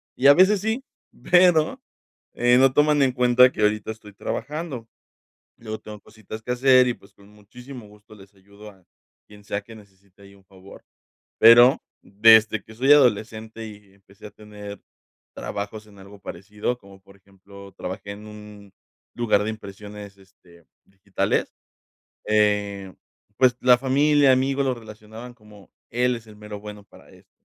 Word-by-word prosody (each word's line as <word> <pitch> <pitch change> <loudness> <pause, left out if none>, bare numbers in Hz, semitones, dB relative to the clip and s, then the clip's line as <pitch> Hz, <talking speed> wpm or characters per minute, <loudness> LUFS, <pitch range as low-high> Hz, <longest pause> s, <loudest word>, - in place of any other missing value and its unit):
y 135 - +2
a 140 - +8
veces 190 +2 +4
sí, 220 +5 -2 0.5
pero 175 -3 +4 0.5
no 125 +2 +4
toman 150 +1 +3
en 135 -1 +3
cuenta 125 0 +4
que - - -6
ahorita 105 0 0
estoy 105 -2 -13
trabajando, 145 - -6 0.7
luego 110 -1 -8
tengo 105 -1 -11
cositas 110 +1 -12
que 125 - -8
hacer 130 0 +4
y, 125 - 0
pues, 100 -2 -22
con 100 0 -21
muchísimo 120 +3 -13
gusto 105 +1 -19
les 100 0 -18
ayudo 100 +2 -16
a 95 -3 -24 0.4
quien 105 -1 -17
sea 100 0 -4
que 115 +2 -14
necesite 100 -1 -21
ahí 100 0 -17
un 100 -1 -23
favor, 95 0 -17 0.5
pero, 120 +3 +7 0.2
desde 110 +1 +4
que 110 - -15
soy 130 +5 +2
adolescente 110 -4 0
y 105 -2 -15
empecé 100 0 -19
a - - -15
tener 105 -1 -11 0.5
trabajos 105 +1 -7
en 100 -2 -18
algo 100 +1 -15
parecido, 105 +6 -5
como 100 -2 -17
por 100 0 -20
ejemplo, 100 +1 -16
trabajé 95 +2 -7
en 105 +1 -13
un 105 -2 -14 0.4
lugar 115 -4 +1
de 110 - -3
impresiones, 105 -1 -11
este, 90 -3 -23 0.2
digitales, 95 0 -3 0.7
eh, 105 -2 0 0.4
pues 125 -2 +3
la 125 -1 +5
familia, 140 +2 +3
amigos 135 +2 0
lo 130 - 0
relacionaban 110 +1 -12
como: 105 -3 -19 0.2
"Él 125 +1 0
es 115 -1 -16
el 105 - -15
mero 105 -1 -9
bueno 105 0 -11
para - - -20
esto", - - -22
105 Hz, 155 wpm, -23 LUFS, 100-125 Hz, 0.7 s, a